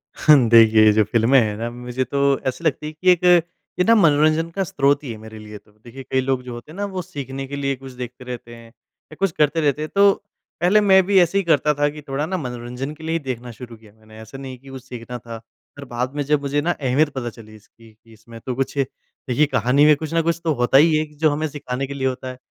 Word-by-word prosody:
हाँ, 140 -6 +5
देखिए, 110 -2 +6
ये 105 - +7
जो 110 +1 +3
फ़िल्में 120 +5 +3
हैं 105 -2 0
ना 115 +1 -3
मुझे 125 +1 -4
तो 140 +2 +1
ऐसी 130 +6 -3
लगती 150 -1 -1
है 155 - -7
कि 180 +4 +3
एक 180 0 +1 0.6
ये - - +4
ना 230 - +5
मनोरंजन 155 -3 +3
का 195 +3 -2
स्रोत 145 -3 +1
ही 130 - -6
है 110 - -7
मेरे 110 0 -11
लिए 105 0 -10
तो। 105 - -23
देखिए 120 +5 -13
कई 130 0 -1
लोग 130 -1 -1
जो 125 -1 -8
होते 120 +6 -10
हैं - - -12
ना 205 - -2
वो 185 - -3
सीखने 135 -4 -7
के 140 - -6
लिए 140 -1 -2
कुछ 135 0 -11
देखते 125 0 -8
रहते 120 -1 -8
हैं 115 0 -14
या 125 +6 -21
कुछ 195 -2 +1
करते 155 +1 +1
रहते 145 -1 0
हैं। 155 - -4
तो 200 0 +6 0.5
पहले 190 +5 +4
मैं 190 -2 +5
भी 195 0 +4
ऐसे 175 +3 +1
ही 200 - +1
करता 150 -3 +2
था 145 0 +1
कि 150 +1 -10
थोड़ा-ना 150 +7 -2
मनोरंजन 125 0 -6
के 160 - -14
लिए 160 +1 -2
ही 165 - 0
देखना 125 -2 -5
शुरू 115 +1 -11
किया 110 -1 -19
मैंने। 110 0 -18
ऐसा 110 +4 -11
नहीं 135 -1 -8
कि 135 +1 -15
कुछ 130 -2 -9
सीखना 125 -1 -8
था 115 0 -9 0.4
पर 140 - -9
बात 125 +2 -4
में 145 - -1
जब 150 0 +1
मुझे 145 +1 -1
ना 170 +4 0
अहमियत 145 0 +1
पता 120 -3 -3
चली 110 -1 -14
इसकी 110 +2 -19
कि 115 +1 -22
इसमें 115 +1 -14
तो 130 - -3
कुछ 135 +2 -3
देखिए 135 +1 -2
कहानी 135 +1 +2
में 150 0 +6
कुछ 155 +2 -7
न 165 - +2
कुछ 170 +1 0
तो 160 -2 +1
होता 120 +2 +4
ही 155 +2 +5
है 155 - 0
जो 155 +1 +3
हमें 155 +2 -2
सिखाने 135 -2 -5
के 140 - -6
लिए 135 -1 -1
होता 130 0 -4
है। 130 - -9
135 Hz, 265 wpm, -21 LUFS, 120-155 Hz, 0.6 s, ये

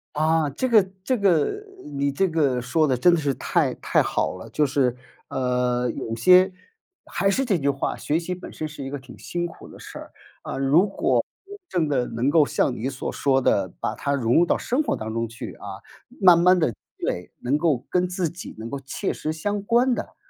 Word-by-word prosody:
啊， 155 0 +2
这 150 - -2
个 225 -5 +6 0.2
这 255 +6 +1
个 200 - +2 0.2
你 140 -1 -1
这 190 +8 +1
个 145 -7 +1
说 150 +6 +1
得 130 -3 +1
真 175 +8 +5
的 170 - +2
是 145 -3 0
太 - - 0
太 - - +1
好 - - -1
了。 95 +5 -10
就 150 +5 +2
是， 130 -3 +1 0.3
呃， 125 -1 0
有 115 0 -4
些 185 +10 +6 0.5
还 195 - 0
是 265 +7 +1
这 205 -7 +2
句 140 -3 0
话， 140 -1 -1
学 150 - -1
习 175 +2 -4
本 180 - -9
身 155 - -5
是 150 -2 -8
一 135 - -5
个 145 - -4
挺 130 -2 -14
辛 175 0 -3
苦 170 - -10
的 - - -13
事 - - -9
儿， - - -11 0.3
啊， - - -5
如 140 +8 +4
果 195 - +1 0.5
真 170 -4 0
的 130 -4 0
能 120 +4 -1
够 150 0 +5
像 130 - 0
你 125 +4 -3
所 135 -1 -4
说 135 -1 +1
的， 100 -7 +1
把 - - -2
它 140 - -2
融 120 -4 +1
入 170 - +6
到 - - +1
生 255 +5 0
活 305 - -1
当 110 0 -5
中 115 0 -1
去 115 +1 -8
啊， 100 -1 -8 0.4
慢 180 -4 +7
慢 180 +2 +5
地 160 -7 +2
积 105 - -15 0.3
累， 90 - -3
能 135 +4 +1
够 150 -6 0
跟 180 0 +1
自 180 -2 -1
己 175 +3 -9
能 110 +1 -6
够 140 - -4
切 135 +9 -3
实 155 - -3
相 205 +6 -2
关 240 +5 +3
的。 - - -5
145 Hz, 235 characters per minute, -24 LUFS, 125-180 Hz, 0.5 s, 慢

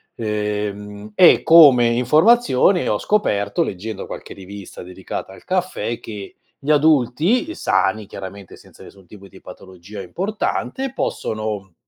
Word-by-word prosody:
ehm, 105 -1 -4
e 175 - +6
come 145 -8 +7
informazione 155 - +3
ho - - 0
scoperto, 100 - 0
leggendo 100 +2 -6
qualche - - -9
rivista 100 0 -11
dedicata 95 +1 -7
al - - -16
caffè, 185 -10 -2
che 105 -3 -9 0.2
gli 145 +2 -2
adulti, 150 - +2
uhm, 330 - -6
sani, 110 - 0
chiaramente 95 -1 -10
senza - - -19
nessun 95 -2 -16
tipo 100 +1 -14
di 95 - -17
patologia 95 +2 -11
importante, 215 - -3
possono 110 - -4
110 Hz, 125 wpm, -20 LUFS, 100-155 Hz, 0.2 s, come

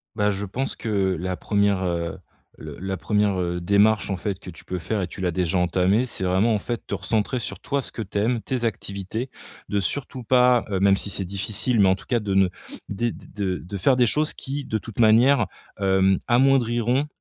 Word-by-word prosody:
Bah, 105 -1 +2
je 100 0 -3
pense 130 +8 -3
que 100 -4 0
la 90 +2 -3
1re, 100 -1 +1
heu, 85 -1 -2 0.4
le - - -9
la 95 0 -3
1re 105 -1 +1
heu, 90 0 -2
démarche, 100 +2 +3
en 95 - -1
fait, 95 0 -3
que - - -9
tu 85 - -14
peux 90 - -3
faire 100 +5 -2
et 90 - -1
tu 95 - -8
l'as 90 - +1
déjà 90 +1 -1
entamée, 90 +5 +2
c'est 120 -6 -4
vraiment, 95 +5 +2
en - - +1
fait, 120 +3 -5
te - - -3
recentrer 105 +6 -1
sur 100 -5 -5
toi 140 0 -1
ce - - -7
que 115 - -4
tu 100 0 -4
aimes, 115 +2 +1
tes 125 -3 -2
activités, 110 +2 -3 0.4
de 100 - +1
surtout 125 +6 -3
pas, 125 0 +4
heu, 95 -2 0
même 100 0 +5
si - - -3
c'est 100 -1 -1
difficile, 100 +5 0
mais 95 - +6
en 95 - +4
tout 95 - -10
cas 120 -2 +1
de 100 -2 -2
ne 95 -1 +4 0.4
dé 115 +4 -1
de 95 -3 -4
de 90 +3 -7
faire 130 +8 +3
des 125 -1 +4
choses 150 +6 +1
qui, 140 +1 -4
de 110 - -2
toute 110 0 -8
manière, 115 +2 +5 0.3
hem, 95 -1 +3
amoindriront, 120 0 +3
100 Hz, 220 wpm, -24 LUFS, 95-120 Hz, 0.4 s, mais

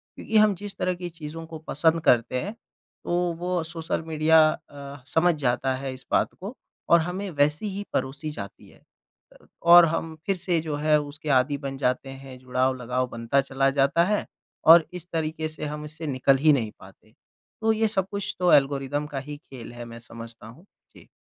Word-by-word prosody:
क्योंकि 220 - -1
हम 210 -2 +5
जिस 205 +2 -7
तरह 185 - 0
की 175 0 -6
चीज़ें 165 0 -8
को 160 -1 -8
पसंद 160 +3 +2
करते 125 +1 +3
हैं 205 +3 -5 0.5
तो - - -5 0.3
वो 180 0 -1
सोशल 165 0 -4
मीडिया 160 0 +4
अ, 140 -2 -10
समझ 170 +4 +3
जाता 130 +1 +1
है 135 0 -5
इस 130 -1 -13
बात - - +2
को 200 +7 -7 0.3
और 170 - +7
हमें 185 +4 -4
वैसे 150 +4 +1
ही 200 0 -4
परोसी 145 +3 -2
जाती 100 -7 -9
है। - - -21 0.6
अ, - - -22 0.2
और 170 0 +9
हम 165 0 -3
फिर 195 - +1
से 175 -1 0
जो 155 -2 -3
है 150 +1 +3
उसके 150 +1 -8
आदि 140 +3 -1
बन 135 -1 -6
जाते 130 0 -1
हैं, 135 -1 -10
जुड़ाव 130 +1 0
लगाव 125 +1 -1
बनता 115 +4 0
चला 135 0 +1
जाता 140 +5 +4
है 210 +2 0 0.4
और 165 0 +9
इस 180 -1 -8
तरीके 160 0 -2
से 155 -1 -6
हम 150 0 -5
इससे 155 +1 -7
निकल 135 0 +3
ही 150 +2 +5
नहीं 115 -6 -1
पाते, 95 +3 -17 0.5
तो 220 0 +3
ये 220 0 +1
सब 195 -3 0
कुछ 200 -1 -3
तो 180 -1 +3
एल्गोरिदम 140 +1 +2
का 145 -2 -4
ही 145 +2 -8
खेल 130 -6 -11
है 120 0 -8
मैं 115 0 -10
समझता 115 -1 -10
हूँ। 145 - -15 0.3
जी। - - -16
150 Hz, 200 wpm, -25 LUFS, 135-170 Hz, 0.6 s, और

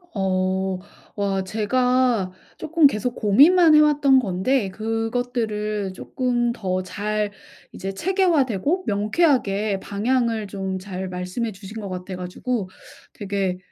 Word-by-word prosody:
어. 190 -1 0 0.4
와 195 -2 -1
제가 240 0 +1 0.3
쪼끔 320 -1 +2
계속 240 0 -2
고민만 310 - +6
해 - - +8
왔던 290 -3 +5
건데 205 +2 0
그것들을 220 -2 -2
쪼끔 240 +3 -1
더 185 -5 -2
잘 210 +2 -2 0.4
이제 195 - -5
체계화되고 330 - +1
명쾌하게 210 - +1
방향을 225 +1 -1
좀 190 -1 -4
잘 185 -1 -6
말씀해 180 +6 -3
주신 205 +2 -9
것 200 - -6
같아 185 +1 -6
가지고 185 +4 -3 0.4
되게 195 -2 -2
210 Hz, 230 characters per minute, -23 LUFS, 190-250 Hz, 0.4 s, 해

